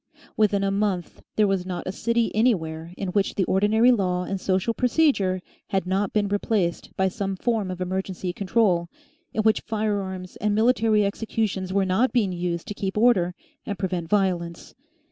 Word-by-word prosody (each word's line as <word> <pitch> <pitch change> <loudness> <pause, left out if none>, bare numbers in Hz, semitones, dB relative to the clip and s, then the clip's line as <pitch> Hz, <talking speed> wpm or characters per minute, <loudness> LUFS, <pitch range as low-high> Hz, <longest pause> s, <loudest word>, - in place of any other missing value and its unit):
Within 205 -2 +2
a 195 - +1
month 195 -4 -2
there 215 - +4
was 195 -2 +1
not 180 -1 -5
a 185 - -2
city 230 +3 0
anywhere 170 -8 0
in 195 - -3
which 195 +1 0
the 195 - +2
ordinary 210 +6 +4
law 180 -6 +1
and 190 +1 -4
social 190 +4 +1
procedure 235 - +2 0.3
had 190 -2 0
not 190 +2 0
been 210 -1 +1
replaced 200 -3 -1
by 190 - +3
some 195 0 -3
form 220 -1 -1
of 185 -1 -5
emergency 185 0 -3
control, 185 -3 +1 0.4
in 215 - -1
which 220 0 +3
firearms 200 -4 -3
and 210 -1 0
military 220 -2 +3
executions 200 -2 -2
were 195 0 +2
not 190 +8 +2
being 215 -6 +2
used 175 -1 -3
to - - -3
keep 195 0 -3
order 195 -7 +3 0.3
and 200 - -4
prevent 180 -4 -3
violence. 180 -4 -1
195 Hz, 170 wpm, -24 LUFS, 185-215 Hz, 0.4 s, there